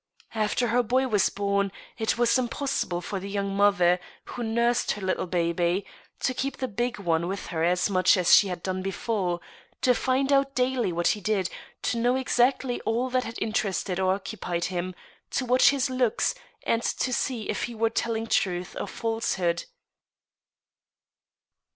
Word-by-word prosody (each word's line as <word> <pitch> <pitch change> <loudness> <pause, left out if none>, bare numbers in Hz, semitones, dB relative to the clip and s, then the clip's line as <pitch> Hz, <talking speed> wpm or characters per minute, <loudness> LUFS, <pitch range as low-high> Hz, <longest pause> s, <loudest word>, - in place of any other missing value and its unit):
After 220 +2 0
her 245 +2 +3
boy 255 +3 +1
was 210 -5 +3
bom, 200 0 0 0.3
it 220 0 0
was 240 -1 +3
impossible 255 -7 -1
for 195 +2 -4
the 195 +2 -7
young 200 -1 -2
mother, 190 -3 +4 0.3
who 245 - -7
nursed 235 +1 +1
her 205 - -8
little 185 0 -1
baby, 175 +2 0 0.4
to 255 - +1
keep 275 +2 -3
the 260 - -2
big 240 +2 -2
one 170 -3 0
with 195 +2 -4
her 160 -1 0
as 180 +1 +2
much 185 -1 +4
as 180 -2 +4
she 205 - +8
had 180 -2 -5
done 185 0 -2
before, 190 -2 -2 0.4
to 250 - +4
find 270 +3 +1
out 275 0 +2
daily 250 -5 +1
what 170 0 +1
he 210 - 0
did, 195 -2 0 0.3
to 235 - 0
know 245 +2 +2
exactly 255 -1 +1
all 240 +3 -1
that 255 0 +1
had 230 - -6
interested 200 -4 -1
or 190 0 +2
occupied 180 -3 -4
him, 180 +1 -3 0.3
to 260 - -1
watch 250 +1 +5
his 280 -1 +1
looks, 255 -3 +1 0.3
and 230 - +1
to 255 +1 -1
see 240 -3 -1
if - - -1
he 240 - -8
were 225 0 +1
telling 225 -1 -1
truth 180 -5 0
or - - -3
falsehood. 225 -7 -1
215 Hz, 170 wpm, -26 LUFS, 185-245 Hz, 0.4 s, she